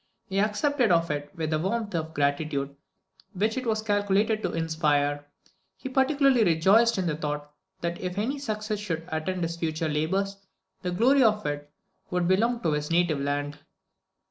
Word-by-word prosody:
He 195 +1 -2
accepted 225 +4 +2
of 165 -2 +3
it 145 0 -3
with 160 -1 -3
that 155 - +1
warmth 205 +4 -2
of 160 -1 -3
gratitude 140 -1 -1 0.6
which 215 +3 0
it 255 -2 -3
was 215 -1 0
calculated 205 +1 +1
to - - -1
inspire; 160 -3 +1
and 145 0 -8 0.5
he 265 - -6
particularly 265 -2 +3
rejoiced 200 +7 +4
in 185 - 0
the 160 -3 0
thought 150 -1 -4 0.3
that 170 0 -3
if 180 0 -4
any 260 +8 -1
success 215 -5 -3
should 165 -5 -4
attend 170 +3 -2
his 165 0 -3
future 160 -1 -2
labours, 190 +7 -1 0.4
the 180 - -2
glory 245 +10 +4
of 215 -3 +3
it 145 0 -4 0.4
would 180 -1 0
belong 230 +6 +2
to 165 - +2
his 150 0 -2
native 170 -3 +2
land. 145 +1 -2
175 Hz, 170 wpm, -27 LUFS, 155-215 Hz, 0.6 s, rejoiced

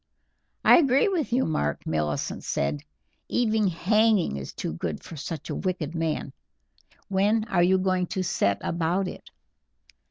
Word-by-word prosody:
"I - - +8
agree 275 - +3
with 335 -9 -1
you, 255 +2 +2
Mark," 75 - -1
Millicent 75 -2 -2
said; 70 +1 -1 0.5
"even 220 -3 +2
hanging 210 - +2
is 70 -1 -6
too - - -4
good 80 -1 -4
for 165 - -9
such 160 0 -6
a - - -2
wicked 180 -5 -3
man. 160 -4 -2 0.7
When 205 +3 +2
are 190 -5 +1
you 185 +2 +4
going 185 -1 0
to 185 - -2
set 100 - +1
about 175 +3 0
it?" - - -9
180 Hz, 150 wpm, -26 LUFS, 145-215 Hz, 0.7 s, I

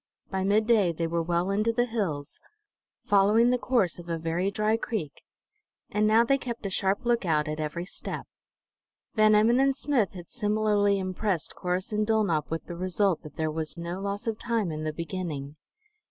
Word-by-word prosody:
By 190 -1 -1
midday 210 -1 +3
they 165 0 -2
were 170 +1 0
well 170 +3 0
into 215 +3 +2
the 240 +1 +1
hills, 190 -12 -3 0.7
following 210 +4 +4
the 250 - +1
course 230 -10 +1
of 175 0 -10
a 165 - -1
very 165 +4 -1
dry 215 +2 +1
creek; 205 -10 -4 0.7
and 210 0 +2
now 220 +2 +5
they 275 +3 +2
kept 235 -4 -6
a 195 - -2
sharp 195 +5 0
lookout 175 -11 +1
at 155 0 -3
every 155 +3 -3
step. - - -5 0.9
Van 215 -1 +5
Emmon 225 +4 +4
and 270 0 +3
Smith 255 -11 +1
had 175 -2 -10
similarly 210 -1 +2
impressed 185 -2 -1
Corrus 180 +2 -2
and 210 0 0
Dulnop 200 -9 +1
with 165 0 -3
the 175 - -7
result 185 0 +1
that 150 - -12
there 155 -1 -1
was 155 0 -4
no 170 +2 -4
loss 200 +1 -4
of 225 -2 -2
time 230 -7 -1
in 155 0 -4
the 155 - -1
beginning. 155 -4 -5
195 Hz, 185 wpm, -27 LUFS, 170-215 Hz, 0.9 s, now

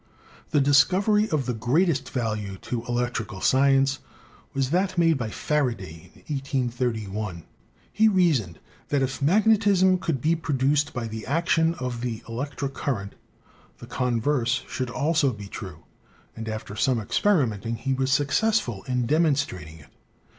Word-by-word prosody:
The 150 - +2
discovery 185 +10 +3
of 150 -4 0
the 125 - -1
greatest 135 - +1
value 105 -6 -3
to 120 -2 -3
electrical 120 -4 -2
science 135 +2 +3 0.5
was 135 -1 -1
that 185 +1 0
made 165 -1 +4
by 115 -3 -2
Faraday 115 - -3
in 150 - -2
183 125 -4 -2
1. 95 -4 -5 0.5
He 220 +1 +4
reasoned 155 - +2 0.3
that 140 -2 +1
if 130 +1 -3
magnetism 195 +1 +4
could 160 -6 -1
be 160 +7 +2
produced 145 -1 0
by 120 -5 -4
the 110 0 -7
action 165 +2 +2
of 125 -4 -4
the 115 -2 -3
elec 125 +5 -5
tric 140 -1 -3
current, 105 -9 -3 0.6
the - - -11
converse 125 +1 0
should 130 -1 -3
also 145 +2 +1
be 105 -3 -8
true, - - -9 0.5
and 110 0 -6
after 110 -1 -6
some 125 +1 +1
experimenting 115 - +1
he 135 +4 -2
was 130 0 0
successful 140 - +1
in 125 -1 0
demonstrating 140 - 0
it. 75 - -17
130 Hz, 145 wpm, -25 LUFS, 115-155 Hz, 0.6 s, made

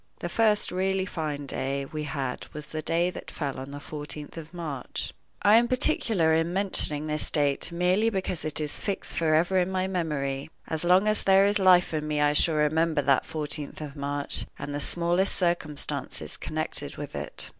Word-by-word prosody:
The 175 - -4
first 215 +1 +2
really 190 +1 0
fine 150 -5 -4
day 135 0 -2
we 150 +2 -5
had 135 -3 -3
was 150 -1 -6
the 155 0 -5
day 170 +3 +1
that - - -8
fell 140 -4 -4
on 135 +1 -7
the 145 0 -7
fourteenth 150 0 -7
of 165 -1 -8
March. 155 -7 -5 0.3
I 205 +3 +7
am 240 +1 +4
particular 230 - +2
in 165 +1 +2
mentioning 180 -6 0
this 150 0 0
date 145 +1 +1
merely 180 +6 +2
because 190 -5 -2
it 155 0 +1
is 150 -1 -1
fixed 200 -2 -2
forever 165 +3 +3
in 180 0 +1
my 185 0 0
memory. 150 -7 -2 0.2
As 160 0 -2
long 180 +3 +5
as 215 0 +2
there 195 0 +5
is 205 0 +2
life 180 -3 +5
in 155 -1 -1
me 150 -1 0
I 145 0 +4
shall 160 +2 +3
remember 155 0 +2
that 135 -2 +3
fourteenth 150 -1 -4
of 150 -2 -7
March, 145 0 -2
and 145 - -5
the 145 - -3
smallest 175 +5 +1
circumstances 170 -5 -2
connected - - -4
with - - -6
it. - - -1
160 Hz, 190 wpm, -27 LUFS, 145-185 Hz, 0.3 s, I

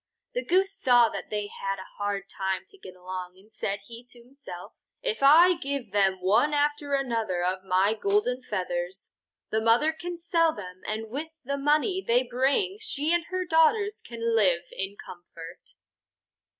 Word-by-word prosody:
The - - -2
Goose 385 +2 +2
saw 245 -9 +5
that - - -7
they 210 -1 -2
had 195 -1 -4
a 190 - -8
hard 205 -1 -2
time 190 -1 -3
to 400 - -13
get 185 - -11
along 180 0 -7
and 205 +3 -21
said 200 -2 -3
he 235 +2 -11
to 240 -1 -11
himself: 245 -9 -11 0.3
"If 485 - -1
I 325 +6 +7
give 280 - -4
them 195 -2 +3
one 230 +11 +3
after 290 -1 +1
another 225 -9 -1
of 185 +1 -1
my 190 +2 +2
golden 215 +4 0
feathers, 180 -4 -4 0.4
the 220 - +1
mother 235 +8 +4
can 350 +2 -6
sell 335 -2 +2
them, 185 -2 -9
and 220 +1 -4
with 290 +5 -3 0.2
the 280 +2 -2
money 305 +7 +1
they 245 +2 +3
bring 275 - +1
she 315 -7 0
and 345 -1 +1
her 370 0 -3
daughters 405 +7 +3
can 235 -1 -9
then 230 0 +1
live 185 -6 +3
in 195 +1 -5
comfort." 175 - -12
235 Hz, 175 wpm, -27 LUFS, 195-315 Hz, 0.4 s, I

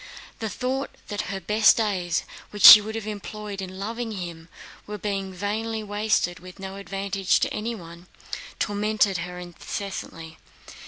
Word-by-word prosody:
The 220 - -3
thought 260 +6 -2 0.2
that 205 -2 -3
her 195 -1 -3
best 210 +4 +4
days, 185 -6 0 0.3
which 205 -1 -5
she 210 - +14
would 220 +1 -6
have 225 -2 -4
employed 210 -1 -6
in 185 0 -7
loving 225 +3 -4
him, 170 -4 -7 0.4
were 210 0 -5
being 195 -1 -3
vainly 215 +4 -3
wasted, 205 -4 0
with 185 +1 -12
no 195 0 -7
advantage 195 0 0
to - - 0
anyone, 180 -6 -6 0.5
tormented 205 -2 +1
her 180 +1 -6
incessantly. 175 -2 -7
200 Hz, 145 wpm, -25 LUFS, 185-215 Hz, 0.5 s, she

